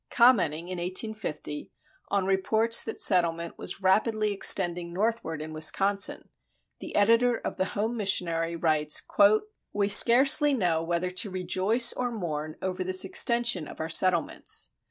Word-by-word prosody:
Commenting 175 -10 +2
in 185 -1 -6
1850 185 -5 -5 0.4
on 200 -2 -1
reports 220 +4 +2
that 225 - -7
settlement 170 -2 0
was 190 - -4
rapidly 215 +2 +1
extending 175 -3 +3
northward 185 -5 -3
in 155 0 -9
Wisconsin, 195 +6 0 0.5
the - - -9
editor 230 +3 +2
of - - -7
the 185 - -1
Home 225 +3 -2
Missionary 170 -5 -1
writes: 155 -2 0 0.7
"We 205 0 -1
scarcely 275 +7 +5
know 175 -8 0
whether 170 +2 -3
to 185 +3 -2
rejoice 190 +6 +1
or 250 -1 -3
mourn 155 -7 -6
over 185 0 -3
this 185 +1 0
extension 235 -4 +1
of - - -12
our 160 - -5
settlements. 165 - 0
185 Hz, 135 wpm, -26 LUFS, 170-220 Hz, 0.7 s, scarcely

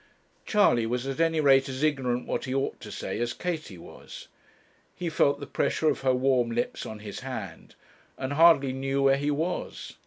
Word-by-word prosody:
Charley 160 - +3
was 125 +2 -2
at 135 +2 -4
any 165 -1 +2
rate 135 -2 +4
as 130 +2 -4
ignorant 130 -5 0
what - - -3
he 130 0 -3
ought 135 0 -2
to - - -10
say - - -4
as 120 0 -1
Katie 160 - -4
was. 85 - -12 0.7
He 175 -1 -3
felt 140 -2 +2
the 140 - -6
pressure 155 +2 0
of 140 - -5
her 130 -1 +2
warm 125 -2 +2
lips 120 +1 -3
on 110 -1 -8
his 105 -2 -7
hand, 110 -10 -7 0.4
and 130 +2 -3
hardly 145 -4 +5
knew 135 +1 -1
where 135 0 +4
he 145 +1 -1
was. 160 +5 -3
135 Hz, 190 wpm, -27 LUFS, 125-150 Hz, 0.7 s, hardly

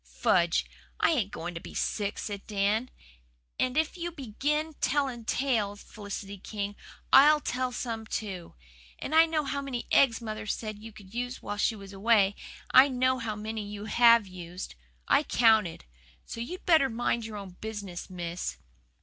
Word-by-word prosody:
"Fudge! 170 - +3 0.3
I - - +4
ain't 240 - +1
going 175 +2 -5
to 165 - -5
be - - -10
sick," 205 -1 -1
said 200 -2 -5
Dan. 210 +4 +1 0.7
"And 255 +2 0
if 315 +2 +1
YOU 345 -1 -3
begin 300 +3 -2
telling 260 -4 0
tales, 220 -6 0
Felicity 200 -1 -7
King, 205 0 -4 0.4
I'LL 300 +2 +8
tell 255 -2 -2
some 230 -3 -4
too. 190 - -5 0.4
I 320 +3 +4
know 315 -2 0
how 280 0 -2
many 265 -3 -4
eggs 245 -5 +5
mother 220 -2 -6
said 215 -1 -3
you 225 +1 -10
could 205 -2 -15
use 245 +2 -4
while 205 - -4
she 220 - +1
was 200 -1 -11
away 200 0 +3 0.4
and - - +11
I - - 0
know 255 -1 +1
how 225 -2 -3
many 215 +1 -4
you 205 0 -7
HAVE 235 -1 +6
used. 180 - -8 0.3
I - - +5
counted. 220 - +3 0.4
So - - -7
you'd 355 +10 -6
better 315 -6 +5
mind 235 -1 -1
your 215 -1 -7
own 190 -3 -9
business, 205 -5 -6
Miss." 175 - -4
220 Hz, 165 wpm, -29 LUFS, 200-255 Hz, 0.7 s, and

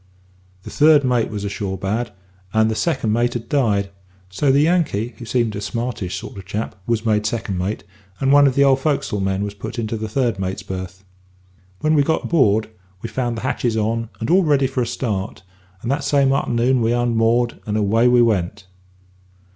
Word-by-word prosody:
The - - -9
third 150 -1 +5
mate 125 -3 +1
was 105 -2 -5
ashore 100 -1 -3
bad, 110 +6 -2 0.4
and 110 0 +3
the - - -2
second 125 -7 0
mate 120 +2 +1
had 115 -1 -4
died, 105 -8 +1 0.4
so 135 +9 +1
the 140 +2 +4
Yankee 150 - +1
(who 120 - -7
seemed 115 -3 0
a 100 - -4
smartish 115 -4 -3
sort - - -9
of 95 - -9
chap) 105 +1 -4
was 115 -1 0
made 105 -1 +2
second 110 -5 -3
mate, 95 +2 -3 0.4
and 135 0 +2
one 145 0 +7
of 130 - 0
the 140 - +5
old 135 -1 +4
fo'c'sle 135 -8 -1
men 95 +1 -1
was 105 0 -4
put 100 +4 -7
into 115 -1 -2
the 110 0 -5
third 120 -2 0
mate's 95 0 -3
berth. 95 0 -7 0.8
When 155 0 +2
we 150 - +4
got 160 +3 0
aboard, 110 - +2 0.3
we 115 - -4
found 120 -1 -2
the - - -5
hatches 120 -3 -1
on, 115 +1 -1
and 115 - -2
all 190 +2 +5
ready 145 -5 +2
for 130 -1 -1
a 120 - -1
start, 110 -7 -3 0.4
and 120 - -1
that 145 +1 -1
same 140 -1 +3
a'ternoon 125 -1 +1
we 115 +1 +2
unmoored, 120 0 +1
and 105 0 -1
away 110 +3 +3
we 125 -1 +5
went. 105 -2 -1
115 Hz, 200 wpm, -20 LUFS, 105-130 Hz, 0.8 s, one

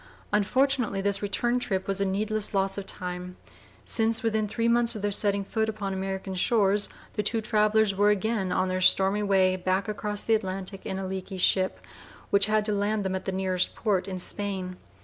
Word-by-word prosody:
Unfortunately 245 +1 +2
this 200 0 0
return 240 +4 0
trip 190 -6 -2
was 195 0 -1
a - - +2
needless 210 +2 -1
loss 195 0 +1
of 200 -1 -6
time, 180 0 -5 0.5
since 225 0 +1
within 220 -1 +1
three 230 +3 -1
months 235 0 +2
of 210 - -6
their 205 - +1
setting 200 0 +1
foot 220 +2 -1
upon 205 -3 -3
American 190 0 -4
shores 205 +1 +2 0.2
the 210 - -1
two 225 +2 -1
travellers 215 -1 +2
were 205 +2 +3
again 210 -2 0
on 185 - +1
their 185 0 -1
stormy 195 +2 +3
way 190 -2 +3
back 185 +2 -1
across 210 0 -3
the 225 - +3
Atlantic 195 -2 -3
in 190 - -3
a 195 - -3
leaky 190 0 -5
ship, 185 - +2 0.5
which 200 0 +4
had 215 0 +2
to 210 - 0
land 205 0 0
them 190 - -1
at 190 0 -4
the 190 - -1
nearest 185 -1 -1
port 200 -4 0
in 190 -1 -4
Spain. 190 -1 -3
200 Hz, 195 wpm, -27 LUFS, 190-215 Hz, 0.5 s, which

